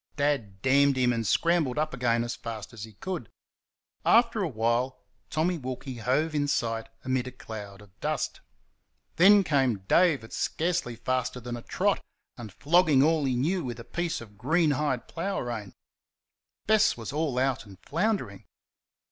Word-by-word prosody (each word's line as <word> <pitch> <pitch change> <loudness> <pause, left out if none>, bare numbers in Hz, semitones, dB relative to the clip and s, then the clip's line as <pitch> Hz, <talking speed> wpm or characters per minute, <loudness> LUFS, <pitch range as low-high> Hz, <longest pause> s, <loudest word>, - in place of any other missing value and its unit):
Dad 135 -10 -1
damned 140 +1 +4
him 125 -1 +3
and 115 -2 -2
scrambled 165 -7 +2
up 155 +1 0
again 120 -2 +1
as 120 - -3
fast 115 -1 -7
as 110 -2 -7
he 110 - -15
could. 165 - -5 0.7
After 230 -2 +4
a 185 - +1
while 120 +1 -1 0.3
Tommy 170 +2 0
Wilkie 130 0 -6
hove 135 +8 0
in 145 -1 +1
sight 115 -4 -1 0.2
amid 130 -1 0
a - - -5
cloud 105 -5 -9
of 95 -3 -22
dust. - - -2 0.8
Then 200 +3 +7
came 135 - +1
Dave 165 - +4
at 115 - -12
scarcely 165 -7 -1
faster 125 +1 -2
than 120 0 -5
a 120 - -7
trot, - - 0 0.3
and 110 -4 -9
flogging 150 - +4
all 155 -1 +3
he 130 -2 +1
knew 165 +8 0
with 120 -2 -5
a - - -7
piece 175 +3 -3
of 105 -3 -13
greenhide 150 -4 +1
plough 195 +4 -3
rein. 110 -5 -5 0.9
Bess 220 - +4
was 115 +2 -6
all 150 -4 -1
out 130 -3 0
and 95 -2 -13
floundering. 165 - -1
130 Hz, 165 wpm, -28 LUFS, 115-160 Hz, 0.9 s, Then